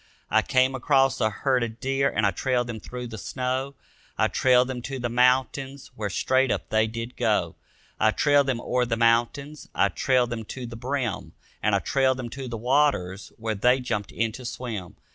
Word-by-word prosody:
I -, -, +5 dB
came 130 Hz, +1 st, +2 dB
across 135 Hz, 0 st, +2 dB
a 110 Hz, -, +3 dB
herd 130 Hz, +4 st, 0 dB
of 115 Hz, -1 st, -4 dB
deer 135 Hz, +1 st, +1 dB
and 110 Hz, -, 0 dB
I 100 Hz, -, +3 dB
trailed 125 Hz, +5 st, 0 dB
them 115 Hz, -2 st, -6 dB
through 125 Hz, +4 st, -7 dB
the 110 Hz, -3 st, -7 dB
snow, 130 Hz, +3 st, -3 dB, 0.4 s
I -, -, +2 dB
trailed 125 Hz, -1 st, +4 dB
them 130 Hz, -2 st, -4 dB
to 135 Hz, +2 st, -5 dB
the 120 Hz, -1 st, -2 dB
mountains 130 Hz, +2 st, +1 dB
where 105 Hz, -1 st, -3 dB
straight 130 Hz, +6 st, +2 dB
up -, -, -2 dB
they 110 Hz, 0 st, +2 dB
did 115 Hz, +2 st, -6 dB
go. -, -, 0 dB, 0.4 s
I 110 Hz, -, +4 dB
trailed 145 Hz, +4 st, +3 dB
them 130 Hz, -3 st, 0 dB
o'er 125 Hz, 0 st, 0 dB
the 115 Hz, -1 st, -1 dB
mountains, 120 Hz, +6 st, +1 dB
I -, -, +3 dB
trailed 125 Hz, -2 st, +1 dB
them 115 Hz, -1 st, -3 dB
to 125 Hz, +3 st, -7 dB
the 115 Hz, -1 st, -8 dB
brim, 125 Hz, -1 st, -3 dB, 0.3 s
And -, -, +2 dB
I -, -, +3 dB
trailed 130 Hz, -1 st, +2 dB
them 125 Hz, -2 st, -5 dB
to 130 Hz, +2 st, -7 dB
the 120 Hz, -1 st, -4 dB
waters 120 Hz, -7 st, +1 dB
where 110 Hz, -1 st, -2 dB
they 125 Hz, +6 st, +3 dB
jumped 115 Hz, -5 st, -3 dB
in 115 Hz, 0 st, -1 dB
to 125 Hz, +3 st, -9 dB
swim. 115 Hz, -7 st, -6 dB
125 Hz, 200 wpm, -25 LUFS, 115-130 Hz, 0.4 s, I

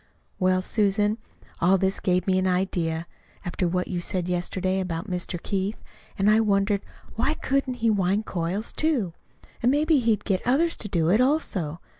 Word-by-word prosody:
"Well, 185 Hz, 0 st, +2 dB
Susan, 210 Hz, +1 st, +1 dB, 0.4 s
all 185 Hz, +3 st, +4 dB
this 190 Hz, +1 st, 0 dB
gave 180 Hz, -1 st, +1 dB
me 185 Hz, -1 st, +2 dB
an 185 Hz, -, +1 dB
idea, 175 Hz, -3 st, 0 dB, 0.4 s
after 175 Hz, +1 st, -1 dB
what 180 Hz, +1 st, -1 dB
you 175 Hz, -2 st, -3 dB
said 180 Hz, -1 st, -2 dB
yesterday 185 Hz, +1 st, -1 dB
about 180 Hz, 0 st, -3 dB
Mr. 180 Hz, -2 st, -3 dB
Keith. 195 Hz, +4 st, -2 dB, 0.4 s
And 195 Hz, 0 st, +2 dB
I 215 Hz, +1 st, +6 dB
wondered 200 Hz, -1 st, +2 dB, 0.3 s
why 275 Hz, +7 st, 0 dB
couldn't 275 Hz, -3 st, -1 dB
he 225 Hz, -, +5 dB
wind 200 Hz, +1 st, +1 dB
coils, 180 Hz, +5 st, -2 dB
too? 260 Hz, -, 0 dB, 0.5 s
And 240 Hz, -, +3 dB
maybe 300 Hz, +1 st, +3 dB
he'd 225 Hz, -4 st, +1 dB
get 190 Hz, -3 st, +1 dB
others 315 Hz, +7 st, +2 dB
to 210 Hz, -, -5 dB
do 170 Hz, -4 st, +1 dB
it 215 Hz, +5 st, +4 dB
also. 190 Hz, -, 0 dB
195 Hz, 170 wpm, -25 LUFS, 180-220 Hz, 0.5 s, I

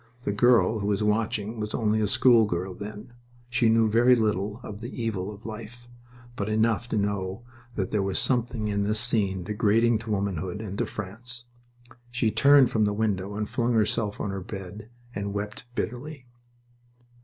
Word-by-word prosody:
The 100 Hz, -, 0 dB
girl 115 Hz, +1 st, +4 dB
who 100 Hz, -, -2 dB
was 105 Hz, 0 st, +1 dB
watching 110 Hz, +1 st, 0 dB
was 105 Hz, 0 st, -3 dB
only 110 Hz, -1 st, +1 dB
a 105 Hz, -, +2 dB
schoolgirl 105 Hz, -6 st, +3 dB
then. 105 Hz, +4 st, -9 dB, 0.4 s
She 120 Hz, -2 st, +3 dB
knew 115 Hz, 0 st, +4 dB
very 120 Hz, +4 st, +5 dB
little 105 Hz, -1 st, 0 dB
of 105 Hz, +1 st, -8 dB
the 120 Hz, +3 st, -6 dB
evil 105 Hz, -4 st, -2 dB
of 105 Hz, +1 st, -13 dB
life, 115 Hz, +2 st, -8 dB, 0.5 s
but 100 Hz, -1 st, -3 dB
enough 110 Hz, +1 st, +1 dB
to 110 Hz, -, 0 dB
know 100 Hz, +1 st, -2 dB, 0.3 s
that 95 Hz, -3 st, -2 dB
there 105 Hz, -, +1 dB
was 95 Hz, -1 st, -1 dB
something 120 Hz, -4 st, 0 dB
in 100 Hz, -1 st, 0 dB
this 105 Hz, +2 st, +1 dB
scene 100 Hz, -6 st, +1 dB
degrading 110 Hz, +3 st, +2 dB
to 110 Hz, 0 st, -9 dB
womanhood 95 Hz, -2 st, -2 dB
and 105 Hz, -3 st, -5 dB
to -, -, 0 dB
France. 115 Hz, +4 st, -6 dB, 0.6 s
She 120 Hz, -2 st, 0 dB
turned 140 Hz, 0 st, +6 dB
from 110 Hz, -1 st, +2 dB
the 105 Hz, -, +1 dB
window 100 Hz, -2 st, -1 dB
and 105 Hz, 0 st, -2 dB
flung 120 Hz, 0 st, 0 dB
herself 105 Hz, -1 st, 0 dB
on 100 Hz, -, -2 dB
her 95 Hz, 0 st, -4 dB
bed 100 Hz, +2 st, -8 dB, 0.2 s
and 100 Hz, -1 st, -4 dB
wept 105 Hz, +3 st, -5 dB
bitterly... 125 Hz, +5 st, -4 dB
105 Hz, 175 wpm, -26 LUFS, 100-115 Hz, 0.6 s, turned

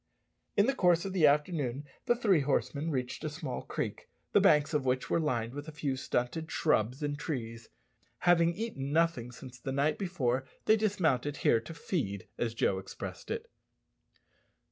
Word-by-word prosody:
In 205 Hz, -, +6 dB
the 270 Hz, -, +2 dB
course 175 Hz, -7 st, +3 dB
of 195 Hz, -, -3 dB
the 165 Hz, -5 st, +5 dB
afternoon 145 Hz, -3 st, +1 dB, 0.2 s
the 240 Hz, -, +4 dB
three 205 Hz, -8 st, +3 dB
horsemen 140 Hz, +3 st, 0 dB
reached 130 Hz, -1 st, -3 dB
a 155 Hz, -, -1 dB
small 150 Hz, -4 st, -5 dB
creek, -, -, -4 dB, 0.2 s
the -, -, +5 dB
banks 150 Hz, +1 st, +4 dB
of 150 Hz, -2 st, +1 dB
which 130 Hz, 0 st, 0 dB
were -, -, +3 dB
lined 120 Hz, -7 st, -1 dB
with 145 Hz, +2 st, -6 dB
a -, -, -6 dB
few 150 Hz, -3 st, -2 dB
stunted 130 Hz, +5 st, -2 dB
shrubs 125 Hz, -2 st, +1 dB
and 145 Hz, 0 st, -2 dB
trees. 115 Hz, -6 st, -5 dB, 0.5 s
Having 170 Hz, -1 st, +4 dB
eaten 165 Hz, -11 st, -4 dB
nothing 160 Hz, -7 st, +1 dB
since 125 Hz, 0 st, -11 dB
the 135 Hz, -, -4 dB
night 140 Hz, +3 st, +1 dB
before, 135 Hz, -10 st, 0 dB, 0.2 s
they 220 Hz, -, +6 dB
dismounted 160 Hz, -, +1 dB
here 115 Hz, -, +4 dB
to 115 Hz, +9 st, -9 dB
"feed," 100 Hz, -, -3 dB
as 115 Hz, -1 st, -1 dB
Joe 95 Hz, -4 st, +1 dB
expressed 95 Hz, -, -8 dB
it. -, -, -3 dB
145 Hz, 170 wpm, -31 LUFS, 125-165 Hz, 0.5 s, In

